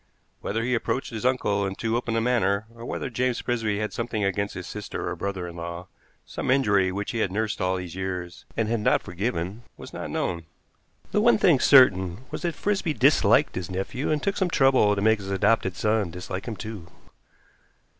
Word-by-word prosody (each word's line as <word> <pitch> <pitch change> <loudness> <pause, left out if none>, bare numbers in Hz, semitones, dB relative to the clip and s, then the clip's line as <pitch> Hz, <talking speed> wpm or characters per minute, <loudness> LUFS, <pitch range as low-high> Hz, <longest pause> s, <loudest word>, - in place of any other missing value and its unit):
Whether 115 +3 -2
he 125 +1 0
approached 125 +2 -1
his 115 +2 -1
uncle 105 -6 +1
in 95 -1 -2
too 115 +2 -1
open 120 -1 -1
a 115 - +2
manner, 110 -4 +1
or 115 0 -11
whether - - -3
James 125 0 -1
Frisby 115 -4 -1
had 105 0 -3
something 115 -3 -2
against 100 +1 -1
his 90 - -6
sister 105 -1 -5
or - - -2
brother 95 -3 -4
in 85 - -9
law, 85 +1 -6 0.4
some - - -5
injury 100 -8 +3
which 100 +2 -3
he 115 - -3
had 95 - 0
nursed 105 +1 -2
all 95 0 +1
these 90 -2 -5
years 90 -2 -5
and 115 - +1
had 115 +1 0
not 105 - +2
forgiven, 95 +2 -3 0.2
was - - -11
not - - -5
known. 85 -1 -2 0.7
The 210 - +2
one 235 +2 +5
thing 170 -9 +4
certain 100 -6 +5
was - - -5
that 170 -2 -2
Frisby 195 -6 -1
disliked - - +4
his 90 -2 -4
nephew 95 +8 -3
and 150 -2 0
took 200 - 0
some 190 -2 +1
trouble 135 -9 +4
to 100 - -2
make 110 0 +4
his 95 -1 -7
adopted 100 -1 +2
son 105 -2 +1
dislike 90 +4 -6
him 115 - -3
too. 105 -5 -7
105 Hz, 205 wpm, -25 LUFS, 95-120 Hz, 0.7 s, one